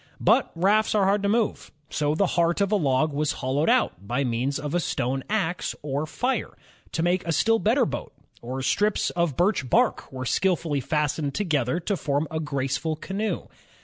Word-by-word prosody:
But - - +3
rafts 210 +6 +2
are 205 - +4
hard 200 +1 +2
to 200 - 0
move, 225 0 0 0.2
so 150 0 0
the 200 - +3
heart 170 +1 +2
of 200 0 +1
a - - +4
log 150 -3 +1
was 150 +1 0
hol 130 +2 -2
lowed 150 - +2
out 240 - +1
by 125 +6 0
means 125 +3 -1
of 145 0 -5
a 175 - +2
stone 135 -4 -1
ax 190 -5 -1
or 145 +1 -2
fire, 250 +12 -2 0.4
to 165 - 0
make 180 +2 +1
a - - +1
still 225 +8 +3
better 240 +4 +3
boat, - - -5 0.3
or 130 +3 -4
strips 205 +10 +1
of 170 -6 -1
birch 175 - +1
bark - - +2
were 130 -1 -5
skillfully 165 -2 +1
fastened 150 0 -1
together 160 - 0
to 200 +4 -1
form 145 -2 -1
a 160 - -2
graceful 140 +1 -2
canoe. 195 +7 -3
160 Hz, 190 wpm, -25 LUFS, 140-200 Hz, 0.4 s, are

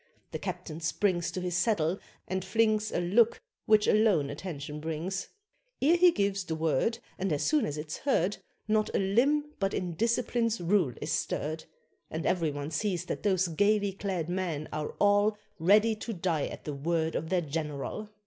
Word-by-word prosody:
The - - -4
captain 160 -1 -5
springs 175 +2 0
To - - -4
his 180 -1 -2
saddle, 175 -2 +1 0.3
and 190 -1 -2
flings 215 0 +1
A - - 0
look 210 +7 +3 0.3
which 215 -1 +5
alone 200 -10 +3
attention 150 -2 -6
brings; 165 +5 -3 0.5
Ere 315 +6 +4
he 355 +1 +7
gives 200 - 0
the 165 -3 -3
word, 160 - +1 0.2
And 190 -1 -1
as 145 - 0
soon 305 -2 +2
as 145 - -4
it's 150 +1 -5
heard, 210 -8 +1 0.3
Not 215 0 +2
a - - +4
limb 275 +10 +2
but 195 -1 0
in 175 -2 -2
discipline's 230 +3 0
rule 175 -6 +2
is 155 - -3
stirred, 155 +1 -2 0.4
And 160 +1 -4
every 170 -4 +1
one 145 +1 -5
sees 180 +1 -1
that - - -4
those 190 -3 +2
gaily 205 +4 +2
clad 190 -4 -3
men 175 -4 -2
are 150 -1 -3
all 205 +1 +4 0.2
Ready 210 +6 +4
to 225 +1 -5
die 170 -5 -1
at - - -8
the 150 - -4
word 160 +3 -1
of 160 - -3
their 185 -1 +2
general. 155 +6 -4
185 Hz, 175 wpm, -29 LUFS, 160-210 Hz, 0.5 s, he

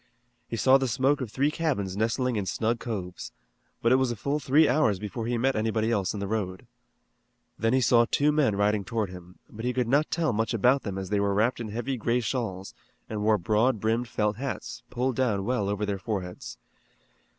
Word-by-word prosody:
He 115 - -4
saw 130 +5 +5
the 135 - 0
smoke 135 +4 +1
of 125 - -3
three 140 +5 +1
cabins 135 - -1
nestling 115 +4 0
in 100 -3 -2
snug 115 +3 0
coves, 95 -6 -5 0.5
but 115 - +4
it 130 - +6
was 130 -1 +1
a 120 - -2
full 140 +7 -1
three 150 +3 +4
hours 125 -7 +2
before 105 +4 -5
he 120 0 0
met 130 +3 +1
anybody 110 +1 0
else 100 -5 0
in - - -4
the 100 - -3
road. 95 -4 -3 0.9
Then 115 +2 +1
he 130 - +3
saw 120 0 +4
two 145 +1 +3
men 145 -9 +2
riding 105 0 +1
toward 105 -1 -2
him, 90 0 -12
but 110 +1 -9
he 125 +1 0
could 125 -2 0
not 145 +5 +2
tell 160 -6 0
much 110 +2 0
about 125 +6 +3
them 100 -2 -5
as 95 0 -5
they 105 - +2
were 100 0 +1
wrapped 115 +5 +1
in 115 - -4
heavy 120 +5 -3
gray 120 +2 +1
shawls, 110 -6 -3 0.4
and 105 -1 -3
wore 105 0 +3
broad 110 +6 +1
brimmed 115 +3 0
felt 105 -2 -1
hats, 130 -1 -5
pulled 125 +1 -1
well 120 -6 +2
down 100 +1 -4 0.2
over 105 +1 -1
their 100 -1 -2
foreheads. 95 -3 -5
115 Hz, 215 wpm, -27 LUFS, 105-130 Hz, 0.9 s, it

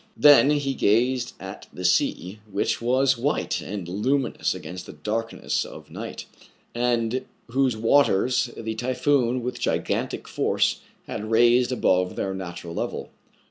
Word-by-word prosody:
Then 145 -1 +7
he 145 -2 +1
gazed 125 +2 +1
at 95 +1 -9
the 90 - -6
sea, 90 +2 +1
which 100 +3 0
was 130 +1 +2
white 145 +5 0
and 95 -3 -6
luminous 125 +9 0
against 90 +1 -8
the - - -9
darkness 110 +9 -2
of - - -11
night, - - -7 0.5
and 120 0 0 0.3
whose 130 -1 +1
waters 125 0 +3
the 110 -1 -3
typhoon 125 +1 +1
with 125 0 -4
gigantic - - -1
force - - +1 0.3
had 110 +1 -5
'raised 120 +2 +4
above 90 -7 +1
their 95 - -2
natural 85 -2 -6
level. - - -4
120 Hz, 135 wpm, -25 LUFS, 100-130 Hz, 0.5 s, Then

